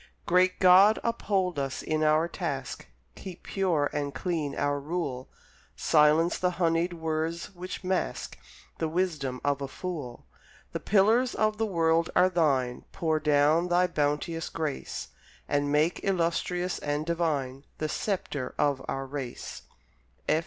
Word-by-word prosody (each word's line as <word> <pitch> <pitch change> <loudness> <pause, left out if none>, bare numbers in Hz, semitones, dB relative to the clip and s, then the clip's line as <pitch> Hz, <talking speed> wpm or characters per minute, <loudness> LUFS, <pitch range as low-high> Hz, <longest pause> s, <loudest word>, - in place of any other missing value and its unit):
Great 185 +1 +3
God, 190 +4 +7
uphold 195 -8 0
us 135 -1 -3
in 155 0 -1
our 155 +2 +3
task, - - -4 0.3
Keep 185 -2 -10
pure 175 -7 +1
and 145 -2 -3
clean 165 -6 -2
our 145 0 0
rule, 140 -4 -4 0.5
Silence 155 +3 +3
the 180 - +2
honeyed 170 0 +1
words 160 +2 -3
which 185 +1 -7
mask 185 0 -2 0.4
The 160 - 0
wisdom 155 -7 -1
of 140 -1 +1
the 140 - -3
fool; 145 -5 -6 0.5
The - - -3
pillars 220 +5 +3
of 215 0 +1
the 225 - +1
world 165 -3 +2
are 180 +1 +5
Thine, 135 -8 +1
Pour 160 -2 0
down 150 +3 +3
Thy 180 +1 +3
bounteous 160 0 -1
grace, 155 -4 -4 0.4
And 145 0 0
make 150 +4 +2
illustrious 180 0 0
and 145 +1 -2
divine 145 -6 -1
The 155 - -2
sceptre 165 -8 -3
of 140 -2 +1
our 135 0 -3
race. 135 -3 -6
165 Hz, 135 wpm, -28 LUFS, 145-180 Hz, 0.5 s, God